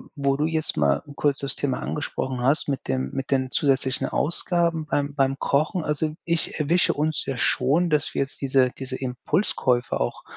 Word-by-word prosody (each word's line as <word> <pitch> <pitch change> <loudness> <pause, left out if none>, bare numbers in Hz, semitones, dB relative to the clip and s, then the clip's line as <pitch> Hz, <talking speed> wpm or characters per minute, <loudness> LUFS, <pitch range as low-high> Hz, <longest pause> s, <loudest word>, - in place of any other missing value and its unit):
Wo 140 -1 +1
du 150 - +1
jetzt 160 -1 -1
mal 70 -1 +2
kurz 145 -2 +1
das 140 -1 0
Thema 135 -3 -1
angesprochen 130 -3 -3
hast, 140 +5 +2
mit 135 -2 -3
dem 65 0 -1
mit 135 - -4
den 130 -2 0
zusätzlichen 135 -1 +1
Ausgaben 170 0 0
beim 145 -1 -1
beim 135 -1 +1
Kochen. 155 +6 0
Also 150 +1 +1
ich 170 -1 0
erwische 170 +5 +2
uns 155 +1 -1
ja 135 - -3
schon, 140 +9 +2
dass 150 -2 +1
wir - - 0
jetzt 135 - -4
diese 130 -2 +3
diese 130 -1 -6
Impulskäufe 125 - 0
auch - - -3
140 Hz, 180 wpm, -24 LUFS, 130-155 Hz, -, diese